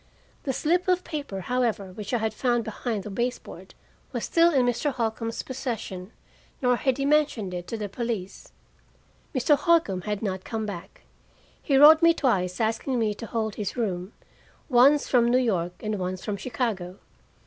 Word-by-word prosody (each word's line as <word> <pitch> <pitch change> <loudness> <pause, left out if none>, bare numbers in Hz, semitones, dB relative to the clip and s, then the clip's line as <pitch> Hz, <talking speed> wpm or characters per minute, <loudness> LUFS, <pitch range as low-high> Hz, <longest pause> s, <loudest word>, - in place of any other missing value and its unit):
The 275 - 0
slip 345 +8 +1
of 365 0 +2
paper, 285 - -5
however, 225 -3 -1
which 210 +1 -7
I 245 - +2
had 220 -1 -1
found 240 0 +1
behind 220 -1 -3
the 210 - -7
base 245 +4 -1
board, - - -13 0.4
was - - -3
still 335 0 +4
in 265 -5 +3
Mr. 245 +4 0
Holcombe's 230 -2 -3
possession, 220 -7 -5 0.5
nor 250 -2 +3
had 260 +1 0
he 275 - -1
mentioned 280 -10 +1
it 175 0 -5
to 230 - -4
the 210 -1 -3
police. 205 -3 -5 0.8
Mr. 265 +3 +4
Holcombe 290 - +2
had 210 0 -2
not 190 -3 -2
come 220 -1 -3
back. 205 - -8 0.6
He 275 - +2
wrote 310 +3 +9
me 335 0 +6
twice 180 - 0
asking 225 +4 0
me 220 -3 +1
to 225 +2 -8
hold 220 -2 -2
his 210 +4 -4
room, 190 -4 -2 0.6
once 275 +3 +5
from 240 -2 +3
New 245 - +4
York 185 -9 0
and 215 -2 -2
once 185 0 -4
from 210 - -2
Chicago. 200 -4 -3
230 Hz, 175 wpm, -26 LUFS, 200-265 Hz, 0.8 s, wrote